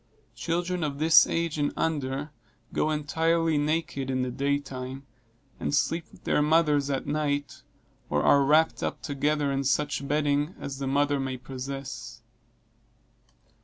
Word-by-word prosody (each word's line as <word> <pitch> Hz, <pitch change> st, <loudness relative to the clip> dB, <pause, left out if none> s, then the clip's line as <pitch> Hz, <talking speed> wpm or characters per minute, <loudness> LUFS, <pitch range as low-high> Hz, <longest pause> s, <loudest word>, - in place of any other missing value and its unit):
Children 170 Hz, +8 st, -1 dB
of 145 Hz, -2 st, -2 dB
this 155 Hz, 0 st, +6 dB
age 165 Hz, -2 st, -1 dB
and 145 Hz, -, +1 dB
under, 145 Hz, -2 st, -1 dB, 0.4 s
go 155 Hz, -, +1 dB
entirely 160 Hz, +1 st, +1 dB
naked, 150 Hz, -3 st, -1 dB
in 130 Hz, -1 st, 0 dB
the 125 Hz, -, -2 dB
day 140 Hz, +3 st, +1 dB
time, 135 Hz, -1 st, -7 dB, 0.5 s
and 145 Hz, -, 0 dB
sleep 165 Hz, +3 st, 0 dB
with -, -, -18 dB
their -, -, +2 dB
mothers 150 Hz, -2 st, +3 dB
at 135 Hz, -1 st, -1 dB
night, 145 Hz, -1 st, -2 dB, 0.5 s
or 75 Hz, 0 st, +1 dB
are 140 Hz, -, +5 dB
wrapped 155 Hz, +3 st, +3 dB
up -, -, -3 dB
together 145 Hz, 0 st, 0 dB
in 135 Hz, 0 st, 0 dB
such 140 Hz, +1 st, 0 dB
bedding 145 Hz, +2 st, +1 dB
as 135 Hz, -1 st, -6 dB
the 135 Hz, -, -3 dB
mother 145 Hz, +1 st, +2 dB
may 135 Hz, -1 st, -3 dB
possess. 130 Hz, -3 st, -7 dB
145 Hz, 145 wpm, -27 LUFS, 135-155 Hz, 0.5 s, this